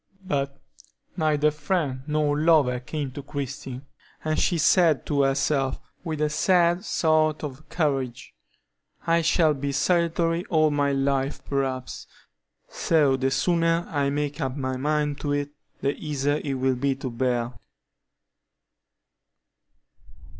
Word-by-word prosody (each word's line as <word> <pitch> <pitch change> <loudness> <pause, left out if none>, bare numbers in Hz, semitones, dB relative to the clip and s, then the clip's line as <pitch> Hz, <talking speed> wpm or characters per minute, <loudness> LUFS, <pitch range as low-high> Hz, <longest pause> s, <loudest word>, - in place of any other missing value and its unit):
But 140 -5 -2 0.6
neither 150 -3 +2
friend 150 -3 -2
nor 150 -1 +1
lover 150 -5 +3
came 140 +2 -4
to 145 - -7
Christie, 135 -2 -6 0.4
and 155 0 0
she 175 - +2
said 160 -1 +4
to 145 -1 +1
herself, 135 0 +1 0.2
with 160 -3 -3
a 150 - +2
sad 175 +2 +3
sort 155 -4 +2
of 145 0 -7
courage: 135 -7 -2 0.7
"I 165 0 +3
shall 160 -1 +3
be 140 0 -3
solitary 170 +2 +1
all 155 -6 +3
my 145 -1 +1
life, 135 0 -1
perhaps; 135 -2 -3 0.6
so 150 -5 +2
the 135 0 0
sooner 165 +3 +1
I 140 -3 +1
make 145 +2 -2
up 135 0 -2
my 130 -1 -2
mind 150 +1 -1
to 145 -1 -1
it, 145 0 -2 0.3
the 140 - +1
easier 145 -1 -1
it 140 -2 -2
will 130 0 +1
be 135 +2 0
to 130 -1 -5
bear." 120 0 -1
145 Hz, 130 wpm, -25 LUFS, 135-155 Hz, 0.7 s, said